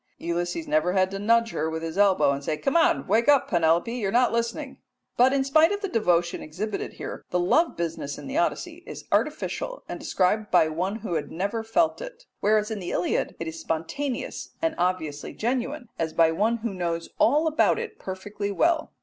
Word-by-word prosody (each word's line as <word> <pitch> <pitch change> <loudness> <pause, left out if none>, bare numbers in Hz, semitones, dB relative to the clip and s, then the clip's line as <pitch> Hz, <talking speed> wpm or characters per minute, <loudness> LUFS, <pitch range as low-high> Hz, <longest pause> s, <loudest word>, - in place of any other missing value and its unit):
Ulysses 175 - -3
never 300 -12 +2
had 190 -1 +2
to 195 - -4
nudge 230 +2 +3
her 155 +1 -1
with 160 0 -4
his 165 0 -4
elbow 195 -7 +4
and 140 0 -3
say, 155 +2 -1
"Come, 330 - +2
wake 230 +5 +2
up, 285 -3 +5
Penelope, 170 +5 +2
you 235 -5 -2
are - - -1
not 245 +1 +3
listening"; 255 +4 -2 0.4
but, 250 +2 +5
in 275 -1 +2
spite 310 +6 +4
of 405 0 -2
the 400 - -1
devotion 175 - +1
exhibited 200 +7 -4
here, - - -7
the 180 - 0
love 315 - +2
business 165 -4 -3
in - - -9
the 270 - -5
Odyssey 335 - -1
is - - -8
artificial - - -1
and - - -6
described 210 +3 0
by 155 - +4
one 180 +6 -2
who 220 -5 -5
had 155 -3 -2
never 200 +6 -2
felt 315 - +1
it, - - -9 0.2
whereas 215 +1 +2
in 215 - -3
the 180 - -5
Iliad 175 - -1
it 165 - -4
is 160 0 -6
spontaneous 245 - -4
and 325 -1 0
obviously 160 -5 -1
genuine, 250 +3 -2
as 160 -1 -1
by 165 -1 +4
one 215 +8 +1
who 225 - -1
knows 170 -2 -3
all 295 +7 +4
about 315 0 +3
it 430 - -6
perfectly 200 +2 -5
well. 325 - +1
210 Hz, 200 wpm, -26 LUFS, 170-270 Hz, 0.4 s, up